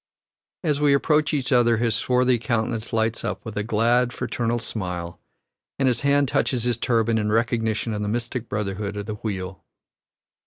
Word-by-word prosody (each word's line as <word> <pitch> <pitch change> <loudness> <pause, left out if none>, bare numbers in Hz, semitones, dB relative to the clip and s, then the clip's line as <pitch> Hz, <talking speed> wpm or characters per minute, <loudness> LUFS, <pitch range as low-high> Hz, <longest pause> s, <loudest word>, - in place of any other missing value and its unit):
As 150 -3 0
we 145 -1 +5
approach 150 +1 +2
each 140 -3 -1
other 120 -2 +4
his 115 0 +1
swarthy 125 0 +2
countenance 110 0 -2
lights 115 0 0
up - - -4
with 110 -2 -6
a 105 - 0
"glad, 120 +3 +2
fraternal 120 -2 -2
smile," 90 -7 -5 0.6
and 135 - +2
his 125 - +1
hand 140 0 +3
touches 125 -1 0
his 120 -1 0
turban 115 -2 +1
in 105 0 -1
recognition 115 0 0
of 105 - -3
the 105 - -2
mystic 120 +2 -3
brotherhood 105 0 -3
of 100 - -4
the 110 - -4
wheel. 95 -4 -4
115 Hz, 170 wpm, -24 LUFS, 105-125 Hz, 0.6 s, we